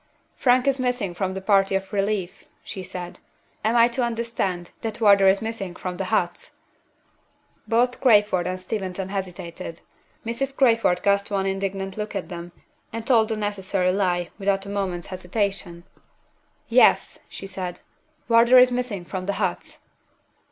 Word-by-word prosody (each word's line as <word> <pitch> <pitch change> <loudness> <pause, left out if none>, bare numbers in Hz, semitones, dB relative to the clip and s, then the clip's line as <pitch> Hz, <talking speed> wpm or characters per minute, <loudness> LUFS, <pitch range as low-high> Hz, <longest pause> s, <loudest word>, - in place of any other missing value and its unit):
"Frank 250 -1 +3
is 275 -1 +2
missing 245 -7 -1
from 190 +1 -2
the 190 - -4
party 195 -1 +3
of 195 +2 -3
relief," 200 -2 -2 0.2
she 190 - -7
said. 180 -1 -7 0.4
"Am 220 +2 +1
I 235 0 +7
to 245 +1 -1
understand 230 -7 -2
that 225 0 -4
Wardour 200 -3 +6
is 195 +3 +3
missing 210 -5 -5
from 180 -1 -5
the 190 - -2
huts?" 180 -4 -1 1.1
Both 245 +2 +1
Crayford 210 -7 +4
and 185 0 -3
Steventon 190 -1 -4
hesitated. 180 -3 -6 0.4
Mrs. 270 +4 -3
Crayford 230 -8 +3
cast 200 0 +2
one 195 -2 0
indignant 195 0 -3
look 210 0 -4
at 195 - -4
them, 175 -1 -7 0.4
and 230 0 -5
told 230 -4 +4
the 220 - -1
necessary 195 -3 0
lie, 180 -3 0
without 195 0 0
a - - -7
moment's 190 -4 -3
hesitation! 185 -2 -3 0.8
"Yes!" - - +4
she - - -8
said. 185 -2 -5 0.5
"Wardour 235 +2 +6
is 250 0 +7
missing 245 -7 -3
from 185 +1 -5
the 200 - 0
huts." - - -3
195 Hz, 150 wpm, -24 LUFS, 185-225 Hz, 1.1 s, I